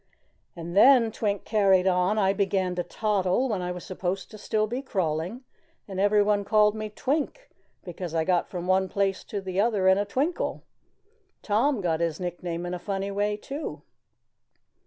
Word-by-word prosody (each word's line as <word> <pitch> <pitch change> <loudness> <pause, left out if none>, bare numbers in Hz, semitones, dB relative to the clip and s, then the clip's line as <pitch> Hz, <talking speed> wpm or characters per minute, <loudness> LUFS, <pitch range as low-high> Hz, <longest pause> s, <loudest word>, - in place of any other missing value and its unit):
"And 170 0 -7
then," 240 +1 +6
Twink 205 -2 -2
carried 195 -4 +3
on, 185 +2 +2
"I 195 -2 +3
began 190 -2 0
to 180 - -1
toddle 205 +5 0
when 210 -6 -2
I 180 0 -3
was 180 -1 -7
supposed 185 0 -4
to 215 - -10
be - - -15
still 215 0 0
crawling, 185 - -2 0.4
and 190 -2 -5
everyone 205 0 +3
called 210 0 +4
me 215 0 -5
Twink, 300 - -3 0.3
because 175 -2 -6
I 160 - +2
got 175 0 +1
from 180 -2 -5
one 190 +1 +2
place 195 0 0
to 200 -2 -6
another 195 +1 +1
in 190 +1 +5
a 205 - 0
twinkle. 280 - -2 0.8
Tom 225 +3 +1
got 165 -3 0
his 165 -2 -1
nickname 175 -1 -4
in 175 - -4
a 180 - -4
funny 195 +1 -3
way, 205 +1 0
too." 280 +8 -6
195 Hz, 170 wpm, -26 LUFS, 180-215 Hz, 0.8 s, then